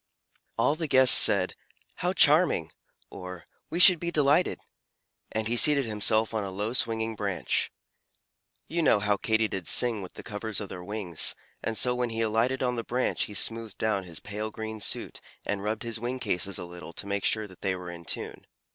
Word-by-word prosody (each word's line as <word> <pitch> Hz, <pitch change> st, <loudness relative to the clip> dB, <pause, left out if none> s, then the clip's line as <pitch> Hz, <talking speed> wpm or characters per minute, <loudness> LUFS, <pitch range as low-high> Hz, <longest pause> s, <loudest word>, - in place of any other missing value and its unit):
All -, -, +2 dB
the 160 Hz, 0 st, -4 dB
guests 130 Hz, -2 st, +7 dB
said, -, -, +6 dB, 0.4 s
"How -, -, -1 dB
charming!" -, -, +4 dB, 0.4 s
or, 90 Hz, -2 st, -9 dB, 0.2 s
"We 170 Hz, -, -4 dB
should 180 Hz, -2 st, +8 dB
be 170 Hz, -, -3 dB
delighted!" 150 Hz, +2 st, +2 dB, 0.7 s
and 110 Hz, 0 st, -2 dB
he 120 Hz, -, 0 dB
seated 140 Hz, +2 st, +6 dB
himself 110 Hz, +1 st, +1 dB
on 110 Hz, -2 st, -2 dB
a 100 Hz, -, -5 dB
low 105 Hz, +4 st, -4 dB
swinging 115 Hz, -2 st, 0 dB
branch. 100 Hz, -3 st, -2 dB, 1.0 s
You 170 Hz, +2 st, -2 dB
know 130 Hz, -9 st, +3 dB
Katydids 105 Hz, -3 st, -1 dB
sing 115 Hz, -4 st, +4 dB
with 90 Hz, -, -10 dB
the -, -, -9 dB
covers 105 Hz, -1 st, -4 dB
of 100 Hz, -3 st, -7 dB
their 90 Hz, -, -8 dB
wings, 95 Hz, -4 st, -2 dB, 0.3 s
and 115 Hz, -1 st, -3 dB
so 125 Hz, -, +2 dB
when 125 Hz, -1 st, -2 dB
he 115 Hz, 0 st, -4 dB
alighted 115 Hz, +4 st, 0 dB
on 125 Hz, -1 st, -1 dB
the 115 Hz, -, -3 dB
branch 125 Hz, +2 st, -1 dB
he 105 Hz, -, -10 dB
smoothed 115 Hz, -1 st, -2 dB
down 110 Hz, -3 st, -1 dB
his 85 Hz, -3 st, -7 dB
pale 105 Hz, +2 st, -6 dB
green 110 Hz, 0 st, -7 dB
suit -, -, -2 dB, 0.2 s
and 100 Hz, -1 st, -3 dB
rubbed 105 Hz, +2 st, -3 dB
his 115 Hz, -1 st, -5 dB
wing 120 Hz, +3 st, -4 dB
cases 100 Hz, -4 st, -1 dB
a -, -, -6 dB
little 85 Hz, -1 st, -11 dB
to -, -, -4 dB
make 100 Hz, 0 st, -3 dB
sure 110 Hz, -1 st, 0 dB
that 95 Hz, -3 st, -16 dB
they 95 Hz, -1 st, -1 dB
were 90 Hz, -1 st, -8 dB
in 85 Hz, -1 st, -11 dB
tune. -, -, -1 dB
110 Hz, 190 wpm, -27 LUFS, 100-120 Hz, 1.0 s, should